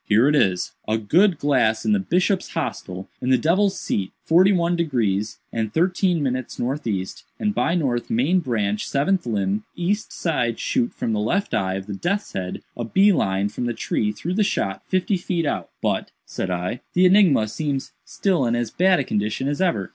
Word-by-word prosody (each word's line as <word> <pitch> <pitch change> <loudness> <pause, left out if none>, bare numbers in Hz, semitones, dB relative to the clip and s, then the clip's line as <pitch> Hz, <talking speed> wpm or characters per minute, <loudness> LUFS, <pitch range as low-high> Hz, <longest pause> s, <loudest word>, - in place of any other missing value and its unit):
Here 110 +5 +4
it 150 - +3
is: 95 -10 +1 0.2
"'_A 110 -1 -1
good 180 - +4
glass 125 -7 +1
in - - +2
the 210 - +3
bishop's 185 0 0
hostel 95 - -4
in 125 - -1
the 130 - +5
devil's 190 +6 +2
seat 95 -2 -2
forty 180 +4 +5
one 175 -2 +2
degrees 115 - 0 0.2
and 110 -2 -2
thirteen 180 - +1
minutes 130 -2 -3
northeast 115 -8 -3 0.2
and 210 -1 0
by 170 -4 +1
north 130 -8 -1
main 140 +11 +2
branch 110 - -1
seventh 150 +4 0
limb 100 -1 -1
east 200 +5 -1
side 125 -9 -1
shoot 240 -3 0
from 115 - -3
the 105 - 0
left 185 - -1
eye 95 -1 0
of 95 0 -5
the 105 - -6
death's 195 - -2
head 90 -1 -4
a 120 - -4
bee 195 - +4
line 100 - 0
from 115 +4 -4
the 120 - -2
tree 105 -1 -1
through 105 - -4
the 210 +3 +2
shot 95 - -1
fifty 185 +1 +1
feet 175 -2 -2
out_.'" 145 - -2 0.2
"But," - - 0 0.2
said 95 - -4
I, 90 +7 -3
"the 180 +1 +5
enigma 180 - +5
seems 140 +4 -3
still 180 -10 0
in 115 - +1
as 120 -1 -2
bad 185 0 +3
a - - +1
condition 105 +3 -1
as 145 +4 -1
ever. 165 - 0
135 Hz, 195 wpm, -22 LUFS, 105-180 Hz, 0.2 s, the